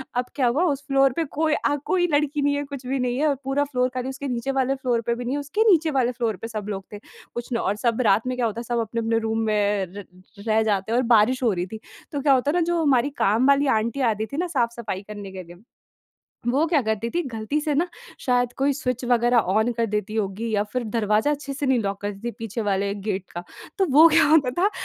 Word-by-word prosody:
अब 245 0 0
क्या 260 -4 +2
हुआ, 270 +9 +2
उस 285 -5 -1
फ्लोर 275 -1 +4
पे 330 - 0 0.2
कोई 315 -1 +2
अ, 290 - +1
कोई 355 -2 +2
लड़की 295 0 +1
नहीं 285 0 +2
है, 285 - -1
कुछ 275 -2 -8
भी 270 +1 -1
नहीं 250 -1 -1
है, 305 +3 +2
और 285 - +2
पूरा 270 +2 +1
फ्लोर 255 -3 0
खाली। 255 0 -3
उसके 270 +1 -5
नीचे 245 +1 -2
वाले 270 0 +1
फ्लोर 250 -3 0
पे 235 - +1
भी 245 +1 -6
नहीं 255 +3 -1
है, - - -1
उसके 290 +10 0
नीचे 325 -3 +3
वाले 255 -3 +1
फ्लोर 235 -3 -2
पे 225 - -6
सब 215 -3 -5
लोग 195 -2 -4
थे। 205 - -7 0.3
कुछ 240 0 -5
न - - +2
और 205 -3 0
सब 230 +3 0
रात 215 +4 +3
में 255 - -1
क्या 245 - +1
होता 225 0 -2
है, - - -5
सब 240 0 -1
अपने-अपने 225 0 -1
रूम 225 0 -1
में 205 -2 +1
र 205 -2 -7 0.4
रह 220 0 +3
जाते 205 -1 -1
हैं 235 - +2
और 255 - +2
बारिश 250 +5 +3
हो 235 - +3
रही 175 -1 -2
थी। 220 +3 -8 0.3
तो 285 - -3
क्या 280 0 +4
हुआ 260 - +4
था - - +4
ना, 350 - +1
जो 340 0 +1
हमारी 280 -3 +3
काम 225 +6 +3
वाली 280 0 +4
आंटी 235 +5 -2
आती 215 0 -2
थी 280 - -7
ना 355 +2 0
साफ-सफाई 235 - -2
करने 205 -2 -8
के 190 -1 -7
लिए, 175 0 -13 0.9
वो 265 +6 +2
क्या 320 -3 +2
करती 220 0 -1
थीं, 345 - -1
गलती 225 +6 -2
से 300 -1 -1
ना 335 +5 +1 0.3
शायद 245 -1 +1
कोई 275 +1 +2
स्विच 255 -3 -3
वगैरह 240 0 +3 0.2
ऑन 220 +3 +2
कर 230 0 0
देती 210 0 -3
होंगी 215 +1 -2
या 205 -2 +1
फिर 250 -1 -1
दरवाज़ा 215 +4 +2
अच्छे 290 -1 -3
से 290 +1 -3
नहीं 260 -2 +3
लॉक 200 -2 -3
करती 205 -1 -5
थीं 235 - -2
पीछे 225 0 -4
वाले 200 +1 0
गेट 200 -2 -3
का। 175 - -6 0.4
तो 385 - +3
वो 310 +4 +8
क्या 320 0 +5
होता 295 -4 +4
था, 405 - +4
245 Hz, 260 wpm, -24 LUFS, 220-280 Hz, 0.9 s, वो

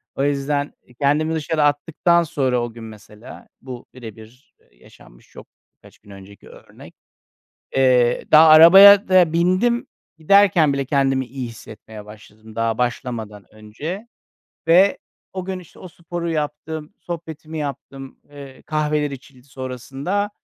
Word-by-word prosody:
O 135 - -2
yüzden 145 0 -2 0.3
kendimi 150 +3 0
dışarı 155 0 -1
attıktan 165 +4 +1
sonra, 130 -6 -1
o 120 -1 -6
gün 115 0 -12
mesela 110 0 -14
bu 125 -2 -10
birebir, 115 +1 -14
eee, - - -33
yaşanmış - - -20
çok - - -14 0.3
birkaç - - -21
gün - - -22
önceki 100 +1 -15
örnek, - - -16 0.8
eee, 125 -2 +2
daha 160 +1 +7
arabaya 190 +6 +8
da 185 -4 +4
bindim. 185 +8 0 0.3
Giderken 170 -3 +3
bile 140 0 -2
kendimi 135 -1 0
iyi 125 0 -7
hissetmeye 110 -1 -13
başladım 110 +1 -16
daha 115 -1 -1
başlamadan 120 -5 -5
önce. 150 - -8 0.6
Ve 185 +4 +4 0.3
o 185 -1 -6
gün, 190 0 -5
işte, 180 - -17
o 185 - -11
sporu 170 0 -6
yaptım, 155 +2 -5
sohbetimi 160 -2 -8
yaptım, 135 -2 -8
eee, 140 -2 -13
kahveler 150 -1 -1
içildi 130 -1 -13
sonrasında. 135 - -5
145 Hz, 130 wpm, -20 LUFS, 120-165 Hz, 0.8 s, arabaya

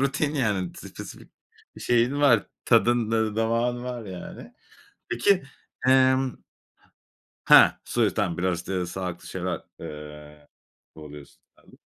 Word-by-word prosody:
rutin, 145 +2 0
yani, 105 - -1
spesifik - - -11 0.5
şeyin 120 +4 +1
var, 125 -7 +4 0.2
tadın, 120 -2 +3
ııı, 110 -2 0
damağın 115 +2 0
var 125 -2 -5
yani. 95 -3 -9 0.6
Peki, 180 +10 +2 0.4
emm 130 0 +4 1.1
Heh! - - +8
Soya 115 -3 +1
s - - -11
tamam 95 -6 -1
biraz, 90 0 0
işte, 90 +1 -3
sağlıklı 90 -1 -6
şeyler, - - -4 0.2
eee, 75 -1 -10 0.5
kovalıyorsun. 75 -2 -12 0.2
Anladım. - - -21
110 Hz, 115 wpm, -25 LUFS, 90-125 Hz, 1.1 s, Heh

